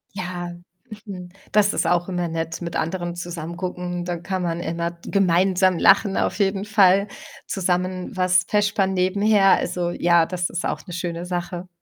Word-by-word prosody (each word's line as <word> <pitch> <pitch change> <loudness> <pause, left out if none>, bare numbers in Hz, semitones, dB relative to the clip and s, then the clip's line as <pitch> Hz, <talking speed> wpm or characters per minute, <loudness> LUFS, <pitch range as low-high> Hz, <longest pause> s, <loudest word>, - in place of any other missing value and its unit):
Ja, 175 -1 -4 0.6
mhm, 180 -3 -7 0.2
das 205 -1 +3
ist - - 0
auch 175 0 +1
immer 175 -2 -2
nett, 165 0 -4
mit 170 -1 -5
anderen 175 +1 -2
zusammen 170 -1 -6
gucken. 180 -1 -4
Dann 175 -1 -4
kann 185 0 -3
man 170 -1 -2
immer 170 0 -2
gemeinsam 185 -1 +2
lachen 195 0 +4
auf - - 0
jeden 195 0 0
Fall, 200 -2 +4 0.4
zusammen 185 -1 -2
was 185 0 +3
vespern 205 -2 +1
nebenher. 195 +2 +4
Also, 175 -1 -2
ja, 170 -1 +3
das 180 -1 -2
ist 175 - -3
auch - - -3
'ne 180 - -8
schöne 170 0 -4
Sache. 175 0 -4
180 Hz, 165 wpm, -22 LUFS, 175-190 Hz, 0.6 s, lachen